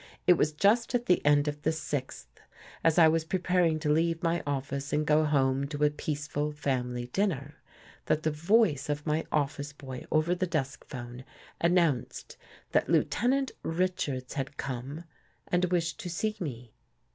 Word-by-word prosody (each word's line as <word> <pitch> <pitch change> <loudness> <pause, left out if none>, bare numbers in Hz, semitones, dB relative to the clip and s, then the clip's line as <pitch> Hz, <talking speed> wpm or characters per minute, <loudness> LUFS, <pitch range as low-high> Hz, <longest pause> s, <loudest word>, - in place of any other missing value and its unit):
It 180 - +8
was 155 -3 +1
just 210 +10 +2
at 240 0 0
the 180 - +3
end 145 0 +4
of 150 0 -3
the 160 - +1
sixth, 150 -4 -5 0.4
as 165 -1 +3
I 165 -2 +8
was 160 0 +2
preparing 175 -1 +1
to 150 - +1
leave 165 +2 +1
my 170 0 +1
office 140 0 -3
and 150 +1 +1
go 155 +1 +4
home 135 -2 +2
to 145 0 -3
a 150 - +4
peaceful 150 0 -3
family 125 -4 -2
dinner, 155 -8 -1 0.5
that 155 - +1
the 155 - +1
voice 160 - +2
of 145 0 -2
my 155 +1 0
office 145 0 -1
boy 130 -3 -8
over 155 +3 +2
the 185 +1 -1
desk 140 -5 -2
phone, 120 -1 -8 0.4
announced 170 -7 +1 0.4
that - - +2
Lieutenant 265 +3 +2
Richards 160 -7 -2
had 140 0 -4
come 135 +5 -5 0.5
and 180 0 +2
wished 170 -2 -1
to 180 - -5
see 215 +5 -1
me. 125 - -6
150 Hz, 165 wpm, -29 LUFS, 140-170 Hz, 0.5 s, It